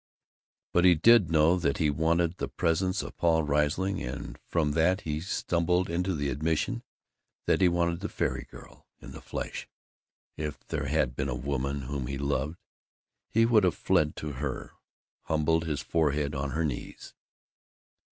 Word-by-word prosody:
But 90 - +4
he 90 -1 +7
did 105 +2 +6
know 80 +2 +4
that 85 -6 0
he 75 -2 +2
wanted 85 +3 +1
the - - -2
presence 90 +3 0
of - - -8
Paul 80 -2 +3
Riesling; 75 +6 0
and 65 +4 -6
from 80 -3 +1
that 85 +6 +2
he 75 -1 -3
stumbled 90 0 0
into 90 +2 0
the 70 -2 -1
admission 80 +4 -1 0.6
that - - +2
he 90 - +6
wanted 85 -1 0
the 100 - -4
fairy - - -2
girl - - -14
in - - -11
the - - -10
flesh. - - -5 0.7
If 75 -1 -5
there - - -2
had - - +1
been 65 +2 -2
a 60 - -2
woman 70 +2 -2
whom 65 -1 -4
he 70 - -3
loved, 70 +3 -1 0.7
he 115 +1 +3
would 115 -3 +4
have 90 -3 +2
fled 75 0 +2
to 75 - -5
her, 65 - -4 0.5
humbled 80 +1 +1
his 75 -3 -2
forehead 75 -3 0
on 70 -1 -2
her 80 +4 -1
knees. 70 -5 -6
80 Hz, 165 wpm, -28 LUFS, 70-85 Hz, 0.7 s, he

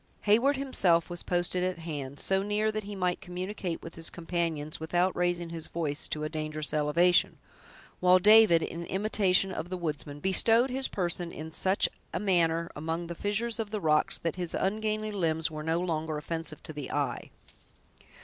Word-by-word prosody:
Heyward 240 +7 +3
himself 185 -12 +1
was 175 - -4
posted 175 0 0
at 185 -1 -1
hand, 145 -4 -6
so 190 0 +1
near 210 +2 0
that 215 -1 -4
he 205 0 -6
might 180 -2 -1
communicate 180 -1 -5
with 165 - -8
his 165 0 -1
companions 165 -3 -3
without 175 +3 0
raising 175 -1 -1
his 165 -2 -1
voice 150 -4 -1
to 150 - -4
a - - -1
dangerous 155 -1 -3
elevation; 165 +4 +3 0.6
while 180 0 +6
David, 210 -4 +6
in 170 +1 -5
imitation 195 -1 +2
of 170 -1 -5
the 185 - -3
woodsmen, 150 -3 -4
bestowed 225 - +4
his 265 +1 0
person 175 -2 -2
in 160 +1 -7
such 190 +4 +2 0.3
a - - 0
manner 170 -4 +1
among 160 +3 -3
the 170 - -5
fissures 220 +6 -1
of 220 -2 -2
the 215 0 -3
rocks, 155 -4 +2
that 165 +1 -3
his 175 -2 -3
ungainly 215 +2 -1
limbs 160 -5 0
were 155 -1 -6
no 160 +2 0
longer 160 -3 -2
offensive 160 0 -2
to 155 - -7
the 145 -2 -6
eye. 140 -5 -2
175 Hz, 180 wpm, -29 LUFS, 160-195 Hz, 0.6 s, while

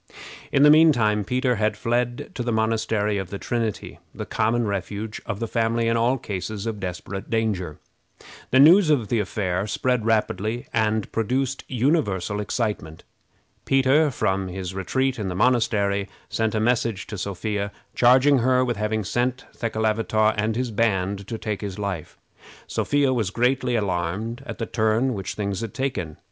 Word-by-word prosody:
In 140 - +4
the 150 - +8
mean 160 +1 +7
time 105 -5 +1
Peter 125 +2 0
had 105 0 0
fled 120 +1 -1
to - - -4
the 120 0 -1
Monastery 110 -2 0
of 95 -2 -5
the 100 - -5
Trinity, 115 -1 -3 0.2
the - - -5
common 115 +2 0
refuge 105 +2 -4
of 100 - -3
the 115 - -2
family 115 0 0
in 115 - +2
all 120 +3 +2
cases 100 -1 -5
of 110 -2 -3
desperate 95 +1 -6
danger. 105 -9 -1 0.7
The 130 - +4
news 165 +5 +7
of 125 -9 +2
the 115 - +1
affair 100 -2 -1
spread 125 +1 0
rapidly, 110 +1 0
and 110 -1 0
produced 130 +4 -1
universal 115 - 0
excitement. 105 -7 -3 0.6
Peter, 135 +3 +3
from 95 -6 -1
his 95 0 -5
retreat 130 +7 -1
in 105 - -2
the 90 - -3
monastery, 100 -3 +1 0.2
sent 110 -1 -1
a - - +1
message 115 -3 0
to 105 - -7
Sophia, 100 +2 -3 0.2
charging 130 +3 +5
her 130 +1 +3
with 120 -3 -2
having 105 +1 -1
sent 125 +6 -1
Thekelavitaw 110 -1 +1
and 110 +1 0
his 125 0 -2
band 100 -3 0
to 115 - -4
take 105 -2 -4
his 100 -3 -5
life. 100 -6 -4 0.5
Sophia 145 -2 +1
was 110 -6 0
greatly 125 +3 +1
alarmed 100 +4 -2
at - - -6
the 115 - -2
turn 110 +4 +1
which 95 -3 -5
things 100 -1 -2
had 115 -3 -6
taken. 95 - -3
110 Hz, 165 wpm, -24 LUFS, 100-125 Hz, 0.7 s, the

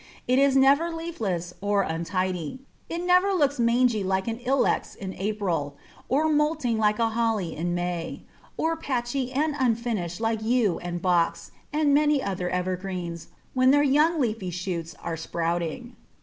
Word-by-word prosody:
It 255 +2 +3
is 275 -1 +4
never 280 +5 +5
leafless 215 - -3
or 200 0 +2
untidy; 180 - -2 0.3
it 340 +1 -3
never 365 +2 +4
looks 285 -5 +1
mangy 235 -2 +3
like 190 +1 0
an 230 0 -2
Ilex 260 +2 0
in 190 -1 -6
April, 180 -9 -2 0.3
or 295 +5 +2
moulting 300 -6 +1
like 210 -1 +2
a 230 -1 +2
Holly 225 -6 -1
in 175 +2 -2
May, 175 -1 -3 0.3
or 325 +1 +1
patchy 255 -3 -2
and 300 +4 0
unfinished 225 -8 -1
like 225 -1 0
Yew 220 -4 +1
and 175 0 -5
Box 170 -2 +1 0.2
and 295 -1 +2
many 295 0 +4
other 185 -6 -2
evergreens 180 -2 -3 0.3
when 255 0 +4
their 290 +2 +5
young 300 +4 +3
leafy 220 -7 -1
shoots 175 -2 -4
are 170 - -2
sprouting. 170 +7 -3
225 Hz, 150 wpm, -26 LUFS, 180-270 Hz, 0.3 s, never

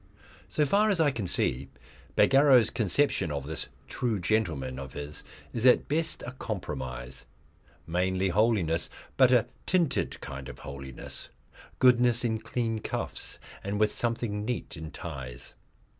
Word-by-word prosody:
So 150 - +2
far 205 +8 +3
as 195 -5 +2
I 150 -3 +4
can 110 -7 -3
see, 65 -4 0 0.5
Bagarrow's 135 -3 +6
conception 110 - +1
of 70 -2 -3
this 80 +1 -3 0.2
True 115 -5 -1
Gentleman 80 -10 0
of 65 -1 -7
his 75 0 -6 0.3
is 115 - -2
at 125 -1 +6
best 160 +2 0
a - - -5
compromise, 65 - -5 0.6
mainly 95 +3 +1
holiness, 95 -5 +2 0.3
but 130 -2 +6
a 125 -3 +5 0.2
tinted 175 -5 +1
kind 70 -1 -7
of - - -9
holiness 65 -1 -7 0.5
goodness 125 -1 +5
in 110 -2 0
clean 115 0 -2
cuffs - - -4 0.3
and 100 +1 -2
with 105 -1 +3
something 115 -3 -1
neat 110 -6 -3
in 80 -1 -7
ties. 65 -8 -7
105 Hz, 140 wpm, -29 LUFS, 75-125 Hz, 0.6 s, Bagarrow's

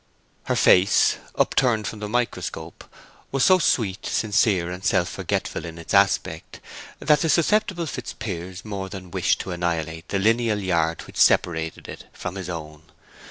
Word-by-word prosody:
Her - - 0
face, 95 +2 +4 0.2
upturned 115 -5 +2
from 110 - -5
the 105 0 -5
microscope, 120 +1 -3 0.5
was 135 -1 +1
so 185 -1 +6
sweet, 110 - 0
sincere, 95 -4 +1
and 90 +1 -7
self 95 -4 +2
forgetful - - -3
in 85 -1 -8
its 85 - -7
aspect 80 0 +1 0.4
that 150 -1 +3
the 165 - 0
susceptible 175 +2 +2
Fitzpiers 95 - -6
more 100 -3 -5
than 95 -2 -9
wished - - +1
to - - -6
annihilate 85 -2 -3
the 100 - 0
lineal 115 +2 +2
yard 85 -4 0
which - - -12
separated 80 -2 +2
it - - -10
from 90 - -6
his 95 -2 -6
own. 75 -3 -7
95 Hz, 155 wpm, -23 LUFS, 85-115 Hz, 0.5 s, so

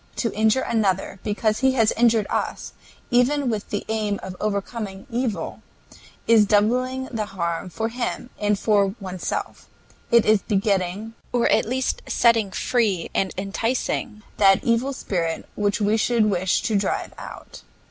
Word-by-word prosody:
To 230 - -1
injure 220 +4 +3
another 195 -4 0
because 215 0 0
he 265 0 +3
has 225 -4 +3
injured 230 -2 +3
us, - - -3 0.4
even 250 +2 +3
with 210 -2 -4
the 205 - -3
aim 215 -2 -1
of 185 -1 -6
overcoming 200 -1 -3
evil, 225 -6 -2 0.6
is 220 -3 +5
doubling 250 +5 +2
the 215 -4 -2
harm 170 -2 -3
for 225 +5 -2
him 245 +1 -4
and 210 -1 +1
for 200 -1 +2
oneself; 185 -3 -5 0.4
it 235 -1 +5
is 215 -2 +4
begetting, 200 +1 -1 0.2
or 245 -1 +2
at - - +3
least 255 +3 -1
setting 230 -4 +3
free 205 -4 0
and 190 - 0
inciting, 215 +1 -2
that 195 -2 +5
evil 235 +3 +1
spirit 170 -10 -3
which 205 +1 0
we 210 +1 +2
should 225 0 +2
wish 185 -1 +1
to 225 -2 0
drive 200 -1 -1
out. - - -10
215 Hz, 145 wpm, -23 LUFS, 195-235 Hz, 0.6 s, is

